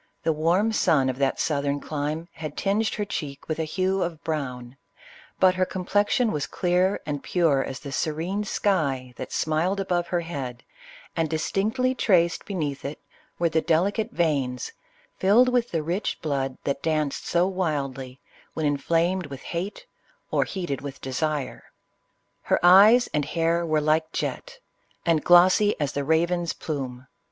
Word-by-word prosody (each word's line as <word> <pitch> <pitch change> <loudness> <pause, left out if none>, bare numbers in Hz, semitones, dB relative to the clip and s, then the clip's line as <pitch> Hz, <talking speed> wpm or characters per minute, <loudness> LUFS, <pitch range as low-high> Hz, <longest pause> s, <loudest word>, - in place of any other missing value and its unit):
The 160 - +2
warm 175 +8 +2
sun 155 -11 +3
of 130 +1 -4
that 135 -1 +1
southern 145 -1 0
clime 150 +3 -3
had 155 -2 -7
tinged 205 +3 +1
her 210 - -2
cheek 145 -7 -6
with 155 0 -3
a 160 - 0
hue 190 +2 0
of 165 -3 -3
brown, 125 -5 -4 0.6
but 185 -1 +5
her 185 0 +1
complexion 205 +6 +1
was 150 -2 -2
clear 180 +2 +1
and 145 -2 -3
pure 160 -7 +2
as 135 - -6
the 140 - -7
serene 165 +8 -2
sky 140 -12 0
that - - -6
smiled 165 +6 0
above 175 -3 0
her 175 0 0
head, 135 -7 -6 0.5
and 165 -2 0
distinctly 215 +11 0
traced 175 -8 +2
beneath 150 -8 -3
it, 140 +2 -5 0.4
were 170 - +2
the 160 0 +1
delicate 195 +8 +1
veins 140 - -1 0.5
filled 225 +7 +5
with 245 -1 +1
the 165 -2 -2
rich 175 +6 -2
blood 135 -3 -2
that 140 0 -2
danced 155 -3 -1
so 175 +1 +3
wildly, 140 -8 -3 0.4
when 160 - -1
inflamed 165 +5 +1
with 135 -2 -9
hate, 195 - -4 0.5
or - - +2
heated 175 -8 -4
with 140 -1 -7
desire. 140 +1 -3 0.8
Iler - - +4
eyes 205 +7 +7
and 150 - +1
hair 165 +2 0
were 155 -1 +2
like 155 +1 +1
jet, - - -4 0.5
and 165 -3 +2
glossy 185 +4 +5
as 145 -2 0
the 145 -1 -2
raven's 170 +3 +1
plume. 130 -4 -5
160 Hz, 155 wpm, -25 LUFS, 145-185 Hz, 0.8 s, eyes